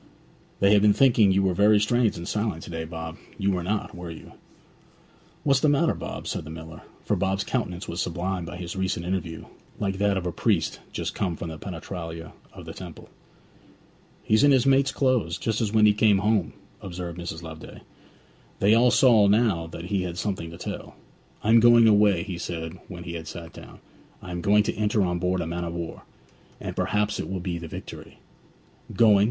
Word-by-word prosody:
'They 100 +1 +5
have 105 - +5
been 105 0 +5
thinking 115 -6 +5
you 95 +1 +3
were 95 -1 +2
very 105 +3 +5
strange 115 +1 +2
and 85 +1 -7
silent 105 -6 -2
to - - -9
day, 80 -1 -4
Bob; 80 0 -7 0.2
you 100 0 +1
were 90 -2 -1
not, 105 +4 -2
were 90 -1 -7
you?' 80 - -10 1.1
'What's 140 -2 +3
the 150 - +3
matter, 150 +4 +3
Bob?' - - -7
said - - -3
the 75 - -10
miller; 80 0 -9 0.2
for - - +1
Bob's 95 +1 0
countenance 100 -6 -3
was 85 - -3
sublimed 90 0 -3
by 85 - -7
his 90 -1 -6
recent 95 -2 -2
interview, 90 -3 -3 0.3
like 95 -2 -2
that 100 -1 +2
of 90 - -3
a 90 - -1
priest 85 - 0
just - - -3
come 90 -5 -2
from 85 - -6
the 80 -1 -8
penetralia 85 -2 -7 0.2
of - - -11
the - - -7
temple. - - -10 1.1
'He's 110 +5 +3
in 145 - +6
his 130 -2 +4
mate's 135 0 +4
clothes, 125 -11 +1
just 110 0 -1
as 105 -2 0
when 110 -1 +5
he 105 - +6
came 105 -1 +4
home!' 105 -4 +1 0.3
observed 90 -2 -6
Mrs. 85 -1 -6
Loveday. 80 -1 -10 0.8
They 100 +3 +4
all 120 +2 +5
saw 115 -5 +5
now 100 -6 +2
that 85 +1 -8
he 100 -2 +1
had 90 -1 -4
something 90 -3 -3
to 85 - -10
tell. - - -7 0.5
'I 105 - -1
am 115 +1 +7
going 120 0 +7
away,' 105 -5 +4
he 95 -4 -6
said 85 0 -5
when 90 -2 -8
he 85 - -6
had 80 -1 -6
sat 85 -2 -8
down. - - -12 0.5
'I 90 - -8
am 85 0 -4
going 105 +3 +4
to - - -1
enter 105 -1 +1
on 90 -1 -1
board 90 +1 0
a - - -2
man 85 +1 -3
of 85 0 -4
war, 85 -1 -6 0.5
and - - -6
perhaps 105 0 0
it - - -4
will 95 0 -3
be 85 -1 -3
the 85 - -7
Victory.' - - -9 0.7
'Going?' 110 -4 +5
95 Hz, 205 wpm, -25 LUFS, 85-105 Hz, 1.1 s, am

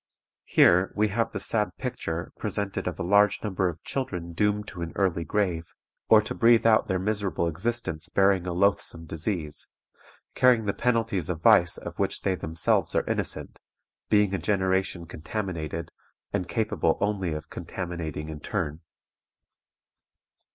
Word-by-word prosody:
"Here 90 +2 +5
we 105 0 +2
have 115 +3 0
the - - -4
sad 105 -2 -1
picture 85 -10 -4
presented 100 -2 -3
of 90 - -3
a 95 - -3
large 100 +3 +3
number 95 -3 0
of 85 0 -9
children 90 -11 -4
doomed 105 +3 0
to 85 - -8
an 85 0 -4
early 90 -4 +1
grave, 85 -2 -1 0.4
or 110 -1 +7
to - - -4
breathe 115 0 +4
out 110 -1 +5
their 95 - +1
miserable 95 -4 -1
existence 85 -1 -2
bearing 95 -2 +3
a - - -1
loathsome 90 -2 +1
disease, 80 -1 -4 0.7
carrying 125 -3 +4
the 100 - 0
penalties 115 -8 0
of 85 -2 -3
vice 90 +1 +5
of - - -8
which - - -1
they 95 - +2
themselves 80 -2 0
are - - +2
innocent, - - -3 0.5
being 105 -2 +3
a 95 - 0
generation 95 -3 0
contaminated, 85 -2 -5 0.4
and 90 - -1
capable 110 -7 +1
only 100 -5 0
of 75 +1 -7
contaminating 85 -3 -5
in 80 -1 -6
turn. 80 -3 -3
95 Hz, 150 wpm, -27 LUFS, 85-105 Hz, 0.7 s, or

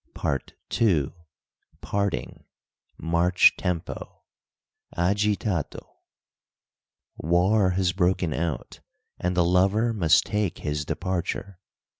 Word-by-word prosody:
PART 70 - -3 0.3
II. 85 - +3 0.7
PARTING 100 -11 -3 0.5
MARCH 85 +2 +4
TEMPO; 90 -3 -4 0.7
Agitato 100 -1 0 1.3
"War 90 +5 +3
has 90 -2 +2
broken 90 -3 +1
out, 80 -5 -3 0.4
and 90 0 -1
the 85 - +4
lover 95 +6 +3
must 85 -7 +4
take 105 -4 -1
his 75 -1 -3
departure." 95 +2 -3
90 Hz, 85 wpm, -25 LUFS, 85-100 Hz, 1.3 s, MARCH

